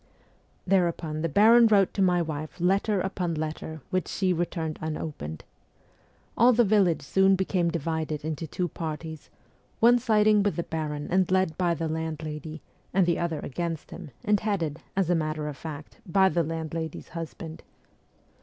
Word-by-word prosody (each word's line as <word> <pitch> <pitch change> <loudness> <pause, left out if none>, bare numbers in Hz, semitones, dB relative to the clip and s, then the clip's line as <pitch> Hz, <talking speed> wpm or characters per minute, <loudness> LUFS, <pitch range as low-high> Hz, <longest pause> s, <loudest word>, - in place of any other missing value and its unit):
Thereupon 170 -4 +1
the 165 - 0
baron 225 +8 +6
wrote 200 -3 +4
to 200 - -1
my 180 -2 +3
wife 155 0 -6
letter 195 +3 +2
upon 180 -3 -2
letter, 155 0 -5
which 185 -1 0
she 185 -2 0
returned 165 -2 -3
unopened. 150 - -5 0.9
All 245 +3 +6
the 240 +1 +5
village 195 -5 +3
soon 190 0 +4
became 185 -2 0
divided 160 -2 -3
into 160 +1 -3
two 180 +4 -2
parties 160 -1 -6 0.5
one 240 +2 +6
siding 215 -3 +4
with 205 0 0
the 170 - -1
baron 150 -3 -4
and 185 0 +3
led 185 -4 +2
by 175 -1 +1
the 165 0 -2
landlady, 155 -1 -5 0.3
and 190 -1 +3
the 170 -1 +1
other 165 -3 -2
against 165 +2 -4
him, 170 -3 -8 0.2
and 210 -1 +3
headed, 170 -8 -2 0.2
as 185 -3 +2
a - - +5
matter 155 -2 -1
of 150 - -5
fact, 150 0 -9
by 190 +2 +4
the 175 - +1
landlady's 160 0 -4
husband. 165 -1 -7
170 Hz, 160 wpm, -27 LUFS, 155-190 Hz, 0.9 s, baron